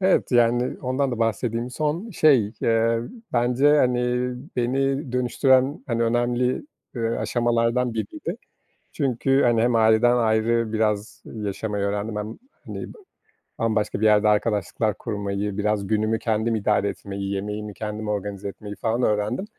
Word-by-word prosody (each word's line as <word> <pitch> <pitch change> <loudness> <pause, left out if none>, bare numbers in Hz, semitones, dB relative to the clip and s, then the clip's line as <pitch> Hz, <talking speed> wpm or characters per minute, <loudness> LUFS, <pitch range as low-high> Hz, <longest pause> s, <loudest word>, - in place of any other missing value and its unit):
Evet. 190 -7 +2
Yani 120 +1 +3
ondan 130 +1 0
da 120 - -3
bahsedeyim. 115 +2 -1
Son 155 - -2
şey, 135 - +3
eee 115 0 +2 0.3
bence, 125 +5 +3
hani, 125 -3 +3 0.6
beni 135 +2 0
dönüştüren, 130 +2 +2
hani, 115 -2 0
önemli, 120 - 0 0.3
eee, 120 - -4
aşamalardan 120 +1 0
biriydi. 110 -3 -4 0.6
Çünkü, 135 +1 +1
hani, 115 -2 +3
hem 120 0 +2
aileden 110 +2 +4
ayrı 115 0 +1
biraz 105 0 -1
yaşamayı 105 -1 -4
öğrendim 105 +2 -2
hem, 105 +1 -5 0.3
hani, - - -7
ba - - -17 0.6
bambaşka 110 -2 0
bir 110 - +1
yerde 105 0 +5
arkadaşlıklar 105 0 +1
kurmayı, 100 -1 -3
biraz 105 -1 0
günümü 110 +1 +1
kendim 110 0 0
idare 105 -1 +1
etmeyi, 100 0 -5
yemeğimi 105 +1 -4
kendim 105 0 -5
organize 100 -1 -3
etmeyi 105 +1 -8
falan 115 +2 -1
öğrendim. 105 - 0
115 Hz, 135 wpm, -24 LUFS, 105-125 Hz, 0.6 s, yerde